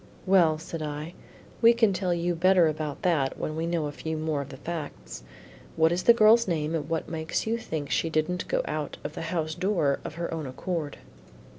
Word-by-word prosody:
"Well," 175 -5 +4
said 160 +1 -7
I, 150 +2 -5 0.5
"we 230 0 +7
can 225 -4 +3
tell 185 0 -1
you 175 0 0
better 180 0 +4
about 155 -2 -3
that 150 -7 +1
when 155 - -3
we 165 +1 -2
know 170 -2 0
a 145 - -3
few 160 +2 -4
more 155 -2 -1
of 140 - -8
the 135 - -9
facts. 160 - -6 0.5
What 160 0 +4
is 175 +1 0
the 235 - +7
girl's 225 +1 +6
name 160 -3 -1
and 155 -2 -2
what 165 -1 -2
makes 160 -1 -2
you 230 +1 -1
think 155 -9 -5
she 165 - +1
didn't 160 +3 -1
go - - 0
out 150 -1 -4
of 150 - -5
the - - -6
house 160 -3 -1
door 175 -6 +1
of - - -7
her 170 0 -3
own 160 -3 -4
accord?" 155 +2 -4
160 Hz, 210 wpm, -27 LUFS, 155-180 Hz, 0.5 s, we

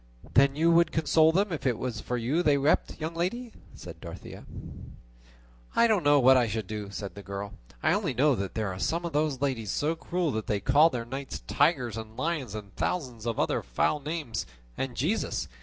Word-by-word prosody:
"Then 135 +1 +5
you 165 +3 +3
would 170 0 +4
console 160 0 +4
them 195 +3 +1
if 145 -5 -2
it 120 -3 +1
was 125 -4 -4
for 125 - -3
you 130 +9 0
they 150 -4 +3
wept, 140 +3 +1
young 160 +1 -3
lady?" 220 +8 -3 0.2
said - - -10
Dorothea. - - -9 1.3
"I 235 - +5
don't 215 -5 +3
know 145 0 +5
what 130 0 +7
I 120 -2 +3
should 110 0 -3
do," 105 0 -5
said 100 0 -6
the 100 - -9
girl; 100 +1 -6 0.3
"I 155 - +4
only 185 - -1
know 145 +3 +4
that 100 -5 -3
there 110 -3 -1
are 95 0 -6
some 170 - -1
of 170 - -4
those 150 -3 0
ladies 125 -7 -1
so 155 - 0
cruel 170 -1 -1
that 110 -2 -3
they 105 - 0
call 145 - +5
their 120 -6 -4
knights 135 +3 -6
tigers 135 -7 +1
and 110 0 -8
lions 150 -10 -2
and 105 -2 -7
a - - -21
thousand 125 -11 -2
other 115 - 0
foul - - 0
names: 145 - -4 0.3
and 135 -2 -4
Jesus! 175 - -1
140 Hz, 205 wpm, -28 LUFS, 110-160 Hz, 1.3 s, what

